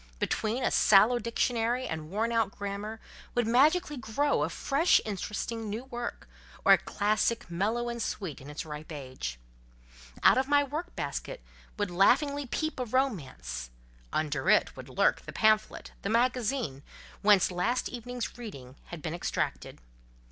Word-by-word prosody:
Between 225 - -1
a - - +2
sallow 215 +4 +5
dictionary 235 +1 0
and 155 -1 -5
worn 220 +5 0
out 225 -3 +2
grammar 205 +2 -5 0.4
would 240 -1 +2
magically 295 +7 +3
grow 255 +5 0
a - - +1
fresh 295 +6 +3
interesting 215 +2 -4
new 220 +4 -4
work, 240 -2 -6 0.4
or - - +9
a - - +5
classic, 215 -1 0
mellow 220 +7 0
and 235 0 -3
sweet 180 -11 -4
in 135 - -10
its 150 +2 -5
ripe 150 +1 -8
age. 130 - -6 0.9
Out - - +7
of 265 - 0
my 285 0 +4
work 310 +6 -5
basket - - -4 0.3
would 205 -3 -1
laughingly 275 - +3
peep 315 +3 -2
a 250 - -1
romance, 140 - -2 0.4
under 145 -3 -1
it - - +4
would - - -10
lurk - - +2
the - - -9
pamphlet, 215 0 +2
the 200 - -3
magazine, 235 - 0 0.4
whence 205 -3 +5
last 225 +8 0
evening's 245 0 -6
reading 140 - -9
had 170 -3 -9
been 160 - -3
extracted. - - -3
220 Hz, 150 wpm, -29 LUFS, 175-250 Hz, 0.9 s, or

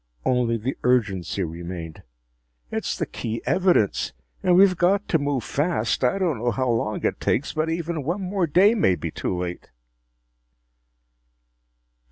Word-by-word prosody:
Only 120 -2 +2
the 120 +5 -3
urgency 100 -6 +1
remained. 85 -1 -6 0.7
"It's - - -2
the - - -1
key 115 0 -4
evidence. 180 - +2 0.3
And 180 - +3
we've 190 0 +6
got 195 +4 +2
to 160 - +3
move 140 -4 -1
fast! 140 -6 -1
I 125 +9 +2
don't 170 - 0
know 120 +2 0
how 125 +3 -1
long 110 -2 -1
it - - 0
takes, 135 - 0
but 155 +1 -1
even 165 -1 -2
one 170 +8 -2
more 185 -1 0
day 190 +8 +5
may 195 - +3
be 80 - -5
too 90 - -3
late!" 90 0 -5
130 Hz, 150 wpm, -24 LUFS, 105-175 Hz, 0.7 s, we've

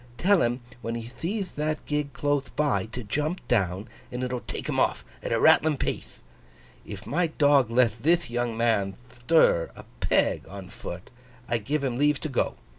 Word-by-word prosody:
Tell 195 0 +4
him, 120 +2 0 0.2
when 115 -1 -3
he 115 - -4
theeth 180 - -4
that 155 0 -2
gig 150 -1 -1
clothe 145 -1 0
by, 145 -6 +1
to 125 +2 -7
jump 150 - -2
down, 100 -2 +1 0.2
and 125 +1 -3
it'll 125 0 -2
take - - -6
him - - 0
off - - +1 0.2
at - - -4
a - - +2
rattling 155 -1 +5
pathe. - - -3 0.7
If 100 0 -8
my 170 +4 +1
dog 145 -5 +3
leth 115 -2 +3
thith 170 +5 +3
young 120 -1 -2
man 105 -5 +1 0.2
thtir 120 - +3
a - - -11
peg - - +1
on 95 -1 -9
foot, 90 0 -8 0.4
I 115 -2 0
give 140 +7 -2
him 125 -2 -1
leave 145 -1 +3
to 155 - -3
go. 130 - 0
125 Hz, 185 wpm, -27 LUFS, 115-150 Hz, 0.7 s, rattling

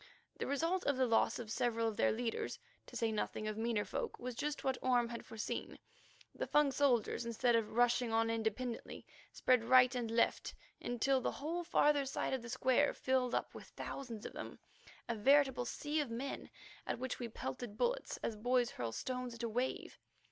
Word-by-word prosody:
The - - -2
result 330 +7 0
of 285 -2 +2
the 260 - +3
loss 230 -2 +3
of 225 -3 -6
several 230 -2 +1
of 220 - -2
their - - +3
leaders, 230 0 -2 0.3
to - - -12
say 230 -1 +1
nothing 215 0 -2
of 215 - -2
meaner 225 -1 0
folk, - - -3
was 250 0 -5
just 295 +5 -3
what 265 -2 0
Orme 245 -2 +2
had 235 -1 -6
foreseen. 220 -1 -5 0.6
The - - -3
Fung 295 -2 +4
soldiers, 255 -5 +2
instead 235 +1 +2
of 225 -2 0
rushing 245 0 +3
on 225 0 +2
independently, 230 +2 -3 0.3
spread 255 -2 +3
to 230 - -8
right 255 0 +7
and 240 -3 -2
left, 230 +1 +1 0.3
until 260 +2 +1
the - - -1
whole 335 +4 -3
farther 295 -4 +3
side 265 - -2
of 260 - -1
the 235 - -8
square 255 +3 +2
filled 260 -1 +1
up - - -2
with - - -10
thousands 235 -6 -6
of - - -6
them, - - -7 0.5
a 235 - 0
veritable 265 +2 +4
sea 295 +5 -2
of 290 -4 -1
men, 250 +4 -4 0.4
at - - -1
which 255 +1 -4
we 240 - -3
pelted 210 - -6
bullets - - 0
as 225 - -1
boys 245 +2 +2
hurl 115 -2 -3
stones 250 - -4
at 235 - -7
a 230 - 0
wave. 245 +4 -2
245 Hz, 195 wpm, -36 LUFS, 230-265 Hz, 0.6 s, right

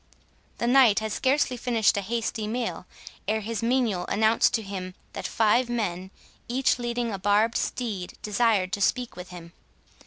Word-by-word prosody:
The - - -2
Knight 245 -4 +5
had 220 -1 -1
scarcely 260 +2 +1
finished 230 -3 +2
a 200 - 0
hasty 225 +1 -2
meal, 230 -4 -3 0.4
ere 220 +1 0
his 220 0 -4
menial 230 -7 0
announced 220 +2 +3
to 225 - -2
him 185 -2 -6 0.2
that - - -4
five 230 +3 +2
men, 190 -6 -2 0.4
each 255 +1 +1
leading 240 -1 -2
a 195 - -4
barbed 205 +4 +2
steed, 210 -8 -3
desired 210 -3 +1
to 205 - -2
speak 245 +4 0
with 180 0 -9
him. 170 -1 -11
220 Hz, 160 wpm, -26 LUFS, 200-240 Hz, 0.4 s, Knight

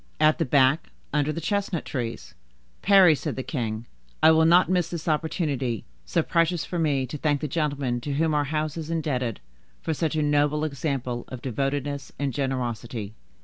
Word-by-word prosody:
"At 155 +2 +4
the 165 - +2
back, 135 +3 +3 0.2
under 150 0 +2
the 155 - -4
chestnut 200 -1 -1
trees." 120 -4 -4 0.5
"Parry," 195 -4 +7
said 150 0 -3
the 130 - -3
king, 115 -5 -3 0.4
"I 160 - +9
will 160 0 +5
not 175 +3 +6
miss 180 -2 +1
this 170 -2 -6
opportunity, 150 - -1 0.2
so 170 - +1
precious 170 0 +1
for 175 - -3
me, 145 -5 +1
to 150 +3 -6
thank 145 -1 +1
the 150 - -2
gentleman 140 -5 -1
to 140 +3 -3
whom 160 +1 +1
our 145 -1 +2
house 155 +1 -2
is 160 -1 -5
indebted 130 - -1 0.4
for 160 - -2
such 160 +1 -1
a 155 - +1
noble 145 +1 +2
example 135 -5 -2
of 125 -2 -8
devotedness 140 +2 -2
and 140 -2 -1
generosity. 120 -5 -3
150 Hz, 180 wpm, -25 LUFS, 130-160 Hz, 0.5 s, I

